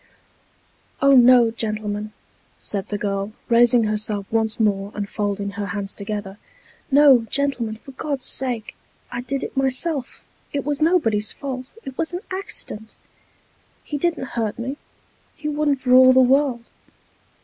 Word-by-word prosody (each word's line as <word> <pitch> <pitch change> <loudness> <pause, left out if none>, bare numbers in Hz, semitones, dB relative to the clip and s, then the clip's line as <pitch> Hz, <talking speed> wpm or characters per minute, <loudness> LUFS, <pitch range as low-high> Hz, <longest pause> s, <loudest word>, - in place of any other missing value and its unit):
" - - -38
Oh, 275 - +6
no, 245 -2 +7
gentlemen," 215 -1 -3 0.5
said 200 -1 -5
the 205 - -2
girl, 200 0 -3 0.2
raising 240 0 +5
herself 210 -1 -2
once 220 -1 0
more, 200 -2 +1
and 205 -1 -3
folding 200 -1 -2
her 200 0 -4
hands 200 0 -4
together; 205 -1 -6 0.3
" - - -29
no, 270 -4 +6
gentlemen, 255 -6 0
for 245 +5 -13
God's 275 0 -4
sake! 245 -4 -3 0.4
I 240 - -3
did 270 +2 -3
it - - -6
myself 270 +1 -1 0.3
it 280 -2 -2
was 295 +1 -2
nobody's 225 - +2
fault 260 +1 -6
it 265 -1 -9
was 330 +1 -1
an 355 - -3
accident. 300 - -5 0.9
He 290 - -4
didn't 330 -5 -1
hurt 225 -3 -2
me; 260 +4 -4 0.6
he 300 - -6
wouldn't 295 -2 0
for 250 -1 +2
all 255 0 +8
the 260 - +5
world. 260 -2 +2
240 Hz, 150 wpm, -22 LUFS, 210-275 Hz, 0.9 s, all